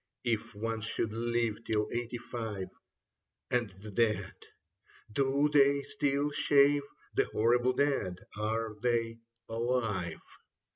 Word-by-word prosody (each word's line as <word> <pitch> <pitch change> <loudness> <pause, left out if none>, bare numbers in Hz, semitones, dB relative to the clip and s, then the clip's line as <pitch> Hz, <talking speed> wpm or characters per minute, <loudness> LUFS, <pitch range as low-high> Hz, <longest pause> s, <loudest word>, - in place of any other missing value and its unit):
If 115 -4 -1
one 115 +1 -2
should 110 0 -2
live 115 -1 0
till 105 -2 0
eighty 120 0 -2
five... 110 -5 -5 0.8
And 120 -3 +2
the 100 +3 -11
dead, 105 -3 +1 0.8
do 140 +4 +2
they 140 -1 +5
still 145 +1 0
shave 145 0 +4
^ - - -13 0.3
The - - +3
horrible 120 +3 +2
dead, 135 -12 +1 0.2
are 110 +1 -1
they 115 -1 0 0.3
alive 115 -7 -1
115 Hz, 115 wpm, -31 LUFS, 110-130 Hz, 0.8 s, they